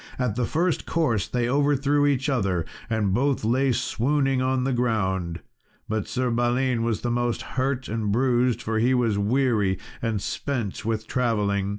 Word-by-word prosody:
At 125 -5 -1
the 125 0 0
first 170 +1 0
course 130 - +1
they 120 -1 -1
overthrew 145 +1 +2
each 135 -1 +1
other, 95 - 0 0.2
and 105 -4 +1
both 135 +1 +1
lay 130 +4 +2
swooning 135 +3 +1
on 130 0 +1
the 135 0 0
ground; 95 -8 -1 0.5
but 110 -2 -2
Sir 125 -1 -1
Balin 120 +1 +1
was 115 -2 -1
the 120 - -1
most 120 0 -1
hurt 130 0 -1
and 110 -2 -2
bruised, 125 +1 +2
for 110 0 -1
he 125 +3 +3
was 115 -5 +1
weary 105 -3 +1 0.2
and 115 -3 -1
spent 120 -1 -3
with 110 0 -2
travelling. 105 -6 0
120 Hz, 165 wpm, -25 LUFS, 110-130 Hz, 0.5 s, he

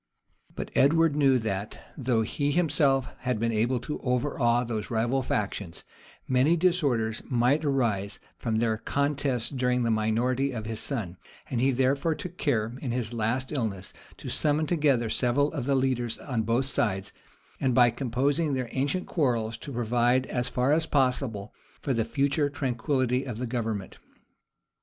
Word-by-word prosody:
But - - -5
Edward 160 +2 +4
knew 135 -3 +4
that, 105 -3 -3 0.2
though 120 -5 +1
he 145 +6 -1
himself 140 -5 +2
had 125 -3 -1
been 115 +1 0
able 120 +3 +1
to 150 - -5
overawe 125 -2 +1
those 110 -3 -4
rival 120 +4 +1
factions, 100 -6 -3 0.4
many 135 +6 +3
disorders 140 -11 +1
might 125 +5 +2
arise 115 -9 0 0.2
from 115 -2 -1
their 110 -1 +1
contests 140 -2 -1
during 125 -2 +1
the 115 - +1
minority 120 +5 +1
of 110 -3 -5
his 110 0 -4
son; 105 -11 -4 0.3
and 120 - 0
he 135 - +4
therefore 135 +5 +1
took 180 +2 -8
care, 115 -5 0
in 135 - -3
his 120 -1 -2
last 120 +4 -1
illness, 110 -9 -3 0.2
to - - -9
summon 150 +1 +1
together 145 -8 +2
several 135 +6 +1
of 140 -6 -3
the 140 0 +2
leaders 125 -3 0
on 125 -6 -2
both 115 +4 +1
sides, 100 -7 -1 0.5
and 130 -3 +1
by 120 -2 +6
composing 140 +5 0
their 130 -2 -3
ancient 145 +8 -1
quarrels, 120 -8 0
to 145 - -8
provide, 120 +1 +1
as 125 -1 -1
far 130 +3 +2
as 160 +1 +2
possible, 125 -7 0 0.3
for 140 - -1
the 115 -2 +1
future 140 +4 +1
tranquillity 130 -1 0
of 125 -5 -5
the 125 - -3
government. 115 -5 -3
125 Hz, 160 wpm, -27 LUFS, 115-140 Hz, 0.5 s, by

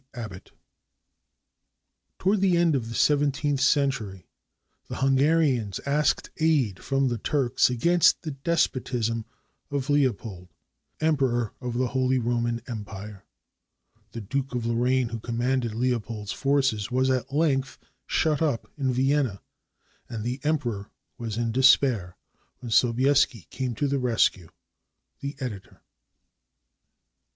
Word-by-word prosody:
ABBOTT 105 -6 -8 1.7
[Toward 195 +1 +1
the 185 -3 +3
end 170 -2 +3
of 115 -4 -2
the 115 - -6
seventeenth 145 0 +2
century, 130 - +1 0.6
the - - -6
Hunga 135 +4 +3
rians 125 - 0
asked 145 +2 +1
aid 145 - +1
from 135 -1 +1
the 120 -2 -2
Turks 130 0 +2
against 170 +8 +3
the 155 - -4
despotism 130 -6 -1 0.4
of 140 -1 -2
Leo 145 -3 +4
pold, 95 -4 -10 0.5
Emperor 135 -7 +1
of 125 -2 -4
the 125 -1 0
Holy 130 +1 +1
Roman 120 -1 -1
Empire. 105 -3 -8 0.9
The 115 - -5
Duke 135 +5 -3
of 120 -2 -2
Lorraine, 120 +1 +1
who 115 -1 -5
commanded 120 0 -1
Leopold's 115 -4 -2
forces, 135 -7 +1
was 130 +1 +1
at 130 0 -1
length 135 -4 0 0.3
shut 155 -2 +1
up 145 -8 -1
in 135 -2 +1
Vienna, 130 -4 +1 0.7
and 110 -2 -5
the 125 +3 -3
Emperor 125 -9 -2 0.3
was 115 -2 -4
in 115 -1 -1
despair, 125 -7 +3 0.4
when 120 -2 -8
Sobieski 125 - +3
came 130 -3 -3
to 145 - 0
the 140 0 0
rescue. 115 -8 +1 0.7
The 140 +1 -5
Editor. 105 -8 -7
125 Hz, 125 wpm, -26 LUFS, 115-140 Hz, 1.7 s, Leo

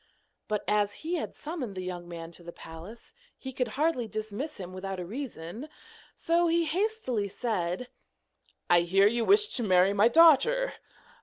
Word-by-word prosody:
But 210 -1 -2
as 205 -1 +1
he 345 +2 -1
had - - -5
summoned 295 - -6
the 185 - -5
young 175 -1 -6
man 165 -1 -8
to 170 - -10
the 170 0 -9
palace, 170 +9 -12 0.2
he 265 -1 -8
could 250 -1 -1
hardly 295 -6 +1
dismiss 215 +8 -5
him 185 -2 -8
without 190 0 -5
a 180 - -5
reason, 225 - -7 0.5
so 340 +1 +1
he 335 0 +2
hastily 330 - -1
said: 195 0 -2 0.8
'I 175 -1 +5
hear 190 +3 +3
you 230 +3 +2
wish 420 - +5
to 250 - -2
marry 190 -2 +4
my 205 +2 +5
daughter? 335 - +5
220 Hz, 165 wpm, -28 LUFS, 185-310 Hz, 0.8 s, I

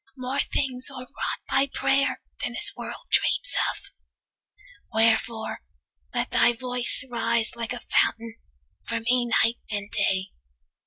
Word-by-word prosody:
More 255 +2 -2
things 260 -3 0
are 265 -2 -8
wrought 255 - -4
by 270 +1 +3
prayer 275 +1 +2 0.2
Than - - -1
this - - +1
world - - -7
dreams - - +2 0.2
of. - - -8 1.0
Wherefore, 225 0 +2 0.5
let - - -1
thy 240 - +5
voice 250 +1 -1
Rise 230 -1 0
like 235 +1 -3
a 245 - -6
fountain 230 0 +1 0.5
for 230 - -2
me 245 +1 +2 0.2
night 230 +1 +1
and 205 -1 -3
day. 190 -2 +1
235 Hz, 135 wpm, -26 LUFS, 225-255 Hz, 1.0 s, thy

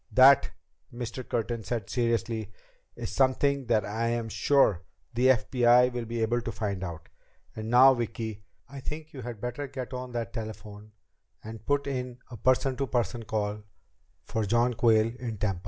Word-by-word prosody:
"That," 135 +2 +7 0.4
Mr. 120 +1 -5
Curtin 115 -1 -2
said 110 -1 -3
seriously, 115 -3 -1 0.4
"is - - -5
something 135 0 +2
that 110 -3 +2
I 110 +3 -2
am 115 -1 -1
sure 125 -9 +3 0.3
the 125 +2 +3
FBI 125 0 +4
will 120 -1 -3
be 115 0 -2
able 120 +2 +1
to - - -4
find 100 -4 -3
out. 85 -2 -7 0.5
And 110 0 -5
now, 130 +3 +8
Vicki, 110 -3 -4 0.2
I 140 +2 -9
think 155 +3 -7
you 135 - -7
had 120 -2 -7
better 125 +5 -4
get 130 -1 -6
on 125 0 -5
that 115 -1 -3
telephone 110 -2 -8 0.5
and 110 -1 -9
put 145 0 +1
in 125 -3 -4
a 120 - -7
person 130 +4 +2
to 135 - -1
person 120 -2 -1
call 105 -1 -2 0.6
for 110 - -2
John 120 +4 +2
Quayle 115 -1 +3
in 115 -4 -4
Tampa." 100 -3 -1
120 Hz, 170 wpm, -28 LUFS, 110-125 Hz, 0.6 s, now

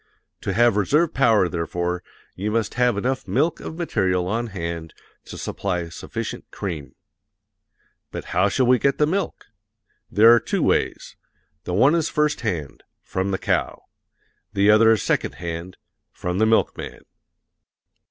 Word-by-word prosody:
To - - -2
have 115 0 +4
reserve 150 - +2
power, 115 -8 +4
therefore, 85 +1 -2 0.3
you 100 +3 -3
must 110 -1 -1
have 125 -3 +2
enough 130 +5 -2
milk 160 +1 +1
of 160 - -7
material 95 - 0
on 115 +4 -1
hand 85 -5 -5 0.3
to - - -9
supply 90 -4 -3
sufficient 85 - -6
cream. 80 -8 -6 1.1
But - - -7
how 90 +3 +3
shall 130 +5 +1
we 125 0 +4
get 140 +3 +1
the 150 - +4
milk? 190 +6 -2 0.6
There 115 +3 +7
are 120 - +6
two - - -1
ways: - - 0 0.5
the 90 - -2
one 130 - +5
is 165 -2 +1
first 150 0 0
hand 85 - -3 0.2
from 95 +1 -2
the 95 - 0
cow; - - -1 0.7
the 100 +1 +4
other 110 +1 +6
is 110 -3 +3
second - - 0
hand 85 +1 -6 0.3
from 90 +1 -3
the 110 - +4
milkman. 110 0 0
105 Hz, 150 wpm, -23 LUFS, 90-120 Hz, 1.1 s, There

